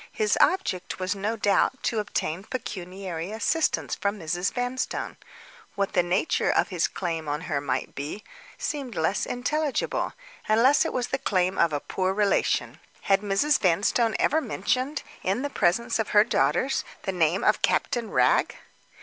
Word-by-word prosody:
His 435 -1 +1
object 370 - +1
was, 185 0 -1
no 205 +3 -2
doubt, 210 +6 +1
to 225 - 0
obtain 190 -4 -2
pecuniary 185 -6 -5
assistance 305 +9 0
from 200 +1 -1
Mrs. 175 +2 -1
Vanstone. 245 +1 -3 0.6
What 200 0 -1
the 180 - +4
nature 180 - +1
of - - +2
his 180 -4 +1
claim 165 -4 -4
on 145 +2 -2
her 150 -5 -2
might 135 -2 -2
be 150 +10 -6 0.3
seemed 275 -6 -4
less 160 +5 0
intelligible—unless 285 - 0
it - - -2
was 245 -1 -1
the 270 - -1
claim 185 -4 0
of 170 -1 +4
a 145 - -1
poor 185 +5 -2
relation. 205 -1 +1 0.2
Had 195 0 +2
Mrs. 210 +9 +2
Vanstone 210 +5 +2
ever 315 +2 +2
mentioned, 255 +4 -1 0.2
in 200 +8 -1
the 285 - -3
presence 230 +5 +1
of 220 - -1
her 210 - +9
daughters, 260 +3 +1 0.2
the 195 - -1
name 175 +1 +1
of - - +3
Captain 235 -4 0
Wragge? - - +2
200 Hz, 155 wpm, -26 LUFS, 180-250 Hz, 0.6 s, her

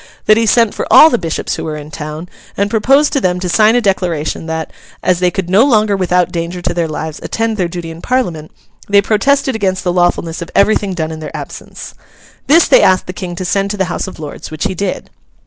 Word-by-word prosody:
'—that 215 - +6
he 225 0 +1
sent 230 -1 +3
for - - -5
all 315 - +8
the 240 - +2
Bishops 165 -3 -3
who - - -5
were 155 -1 -4
in 150 0 -10
town, 155 +3 -7 0.3
and 200 +1 0
proposed 270 +6 +3
to 275 - +1
them 180 -3 0
to 180 - -3
sign 215 +5 +4
a 245 - +3
declaration 175 -6 -1
that, 160 0 -4 0.3
as 180 -1 +2
they 180 0 +2
could 180 0 -4
no 190 +5 +4
longer 215 -6 +2
without 180 -2 +1
danger 170 +1 -4
to 175 - -2
their 170 -1 -1
lives 155 0 -5
attend 225 0 -2
their 185 -4 -1
duty 170 -1 -6
in 165 +1 -11
Parliament, 175 -12 -2 0.4
they 200 0 +5
protested 265 +7 +1
against 190 -4 -1
the 180 - 0
lawfulness 175 -1 0
of 170 - -6
everything 200 -2 +2
done 160 -2 -3
in 160 - -7
their 155 - -7
absence. - - -9 0.5
This 325 +4 +5
they - - +6
asked 185 - +3
the 180 - -7
King 175 -1 -6
to 185 - -5
send 195 +2 0
to 205 - -3
the 190 - +1
House - - -3
of 190 - -9
Lords, 150 -2 -8
which 155 -1 -5
he 195 -1 -1
did. 185 +1 -4
185 Hz, 235 wpm, -15 LUFS, 170-215 Hz, 0.5 s, all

